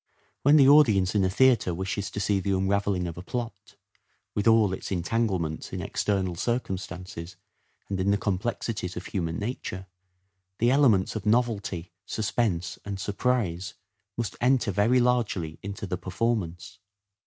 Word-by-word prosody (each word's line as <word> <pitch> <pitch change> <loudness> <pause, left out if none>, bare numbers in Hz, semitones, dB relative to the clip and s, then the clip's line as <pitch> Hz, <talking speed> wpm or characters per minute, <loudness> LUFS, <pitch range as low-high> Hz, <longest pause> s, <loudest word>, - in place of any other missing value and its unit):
When 145 +2 +5
the 140 -3 +7
audience 110 -11 +5
in 100 -2 +2
a 95 - +2
theatre 115 -5 +3
wishes 95 +1 -3
to 100 - -5
see 100 0 +1
the 95 0 0
unravelling 95 -1 0
of 85 0 -5
a - - -5
plot, 120 +4 -6 0.6
with 105 +2 0
all 110 -4 +5
its 95 - -6
en 90 -3 -1
tanglements 95 -8 -1
in - - -4
external 95 -3 -1
circumstances 90 -5 -4 0.5
and 95 -1 -3
in 95 +1 +1
the 100 - +3
complexities 100 -1 -2
of 90 - -6
human 85 -3 -2
nature, 100 -4 -4 0.7
the 120 +2 +3
elements 120 -10 +3
of 110 -1 -4
novelty, 105 -7 0 0.2
suspense 95 -5 -1
and 100 -1 -5
surprise 100 -5 -1 0.4
must 120 -2 -3
enter 125 -3 +3
very 105 +7 +3
largely 110 -10 0
into 100 +1 -6
the 90 -1 -3
performance. 95 -2 -2
100 Hz, 150 wpm, -27 LUFS, 90-115 Hz, 0.7 s, the